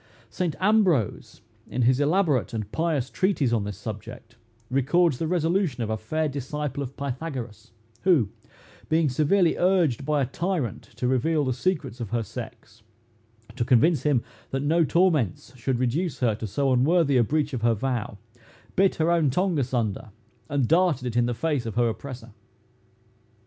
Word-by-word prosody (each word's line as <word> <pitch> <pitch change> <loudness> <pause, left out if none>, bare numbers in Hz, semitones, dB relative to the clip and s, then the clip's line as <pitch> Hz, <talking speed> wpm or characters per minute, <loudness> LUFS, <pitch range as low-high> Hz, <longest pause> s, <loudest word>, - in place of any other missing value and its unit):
Saint 175 -5 -2
Ambrose, 185 - +1 0.3
in 125 - -1
his 125 +2 +3
elaborate 145 - +1
and 105 -2 -4
pious 160 -6 0
treatise 150 -7 0
on 110 -4 +1
this 100 -2 -5
subject, 115 +3 -8 0.4
records 145 +3 +2
the 165 - -1
resolution 170 -5 0
of 110 - -3
a - - +1
fair 155 +9 -1
disciple 145 +1 -4
of 135 -1 -6
Pythagoras, 130 -5 -5 0.3
who, 165 - +3 0.6
being 160 -2 +3
severely 160 +7 +2
urged 175 -8 +2
by 150 +1 +1
a 135 - +2
tyrant 155 - -2
to 125 - -2
reveal 145 +4 +1
the 130 - 0
secrets 140 -2 -2
of 115 -4 -5
her 115 +1 -1
sex, 105 +1 -9 0.7
to 125 - 0
convince 130 +7 +3
him 140 -6 +1 0.3
that 135 +1 -2
no 165 +3 +3
torments 150 - +1
should 130 +1 -1
reduce 130 +5 -1
her 120 -4 +2
to 110 +1 -5
so 135 +6 +1
unworthy 145 +3 +3
a 125 - +5
breach 145 +4 -1
of 125 - -3
her 115 -1 +3
vow, 120 -3 -3 0.6
bit 195 0 +3
her 160 +1 +1
own 165 -4 +3
tongue 180 +3 +1
asunder, 120 -4 -2 0.4
and 140 -4 +1
darted 165 -6 +2
it 120 -2 -3
in 120 0 +3
the 120 - -2
face 140 -2 -1
of 110 - -5
her 120 0 +3
oppressor. 120 0 -7
135 Hz, 165 wpm, -25 LUFS, 120-165 Hz, 0.7 s, a